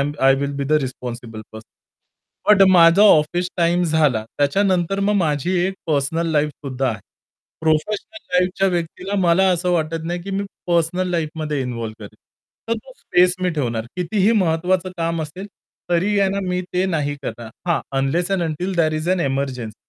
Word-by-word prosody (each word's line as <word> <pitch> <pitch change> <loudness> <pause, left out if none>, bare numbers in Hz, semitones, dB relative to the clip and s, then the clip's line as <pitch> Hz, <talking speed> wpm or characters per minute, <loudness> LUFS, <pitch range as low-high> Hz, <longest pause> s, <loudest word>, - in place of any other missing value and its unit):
M 145 +1 0
I 135 0 +5
will 140 +1 -2
be 140 - -2
the 150 - -2
responsible 120 -3 -6
person 110 0 -11 0.9
but 195 - +5
माझा 170 +1 +6
office 175 -2 +4
time 175 0 +2
झाला. 150 -9 +2
त्याच्यानंतर 185 +5 +1
मग 205 +1 +1
माझी 155 -2 0
एक 195 - -3
पर्सनल 160 +2 0
लाईफसुद्धा 145 -3 -1
आहे. 110 -3 -3 0.6
प्रोफेशनल 180 - -1
लाईफच्या 185 +2 +1
व्यक्तीला 180 +2 -3
मला 180 +2 +4
असं 180 0 0
वाटत 165 -1 -1
नाही, 175 +1 -3
की 195 - -7
मी 195 +1 -2 0.2
पर्सनल 175 +1 +1
लाईफमध्ये 155 -3 -2
इन्व्हॉल्व्ह 115 -3 -5
करेल. 100 - -13 0.5
तर 230 - +2
तो 260 - -13
स्पेस 180 0 +3
मी 180 - +2
ठेवणार, 120 -8 -2
कितीही 190 +4 +1
महत्वाचं 185 -1 +1
काम 165 -1 -1
असेल 180 +6 -7 0.4
तरी 190 +4 +2
आहे 195 - +3
ना 200 - -2
मी 180 0 0
ते 180 +1 +1
नाही 150 -5 -1
करणार. 115 -3 -6 0.2
हां 170 - +2 0.2
unless 160 +7 0
end 195 -2 +1
until 170 +4 -2
there 160 -2 +2
is 155 +2 -3
an 185 -1 +2
emergency. 135 -5 -2
165 Hz, 170 wpm, -20 LUFS, 145-180 Hz, 0.9 s, माझा